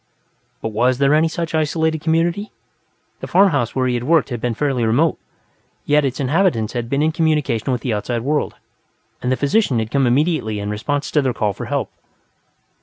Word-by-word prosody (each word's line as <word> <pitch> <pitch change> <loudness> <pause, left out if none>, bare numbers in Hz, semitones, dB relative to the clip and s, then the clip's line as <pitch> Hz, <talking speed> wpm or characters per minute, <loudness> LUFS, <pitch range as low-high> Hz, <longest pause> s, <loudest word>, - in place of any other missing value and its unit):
But 110 - -1
was 120 +4 +1
there 140 +1 +3
any 155 +2 +4
such 165 0 -4
isolated 160 0 0
community? 170 +6 0 0.7
The - - -6
farmhouse 155 - +2
where 130 -1 +1
he 125 - +1
had 120 -1 -2
worked 160 0 +3
had 120 -3 -4
been 120 -2 -1
fairly 135 -2 0
remote, 140 +9 +2 0.7
yet 150 0 +3
its 130 -2 -2
inhabitants 140 - +1
had 120 -2 -3
been 140 +3 +1
in 160 - +2
communication 150 -7 0
with 125 -2 -1
the 125 - -1
outside 115 +3 -2
world, 150 +3 -1 0.7
and 125 - -1
the 130 - +1
physician 145 - +1
had 110 0 -2
come 135 -2 +2
immediately 135 -4 +1
in 100 +1 -3
response 145 +7 -2
to 150 - +3
their 130 -3 -1
call 105 -3 0
for - - -7
help. - - -2
140 Hz, 190 wpm, -19 LUFS, 120-160 Hz, 0.7 s, any